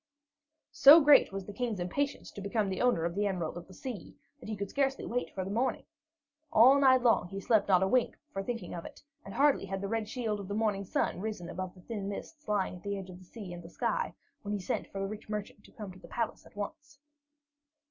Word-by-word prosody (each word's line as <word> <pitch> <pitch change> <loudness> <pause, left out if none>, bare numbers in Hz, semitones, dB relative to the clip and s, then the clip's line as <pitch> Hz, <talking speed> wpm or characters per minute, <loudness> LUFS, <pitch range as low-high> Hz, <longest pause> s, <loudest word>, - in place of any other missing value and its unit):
So 295 +1 +9
great 290 -6 +6
was 195 -1 -5
the 205 - -8
King's 230 -2 -2
impatience 280 +11 -2
to 200 - -8
become 200 +1 0
the 190 - -2
owner 245 -10 +3
of 170 - -1
the 205 +2 +1
Emerald 180 -5 -2
of 175 - -8
the 185 - -14
Sea, 240 -9 -7 0.2
that - - -10
he 215 - -2
could 200 0 -4
scarcely 275 -1 0
wait 245 +2 -2
for 190 -2 -2
the 195 - -4
morning. 240 +5 0 0.7
All 255 +6 +7
night 260 -2 +5
long 230 -6 +4
he 195 +2 -6
slept 210 0 +2
not 190 -2 +5
a - - +3
wink 250 +4 +2 0.2
for 195 - -2
thinking 210 -3 -4
of 170 - -5
it, - - -11 0.2
and - - -9
hardly 280 -7 +3
had 195 0 -3
the 200 - -3
red 220 0 -2
shield 225 -4 -2
of 200 - -7
the 205 - -3
morning 210 -3 0
sun 180 - -1
risen 200 -5 -4
above 185 0 -5
the 185 - -15
thin 200 -1 -5
mists 300 +9 -8
lying 195 -3 0
at - - -15
the 200 -1 -3
edge 190 -1 -7
of 180 - -11
the 185 - -15
sea 190 -2 -8
and 175 0 -10
sky, 485 - -1 0.3
when 205 0 -4
he - - -3
sent 185 - -2
for 195 - -7
the 195 - -1
rich 210 +1 -8
merchant 210 -1 -5
to - - -17
come 210 -4 -8
to 185 - -14
the - - -13
palace 230 -1 -3
at - - -21
once. 295 +9 -7
205 Hz, 250 wpm, -31 LUFS, 190-245 Hz, 0.7 s, So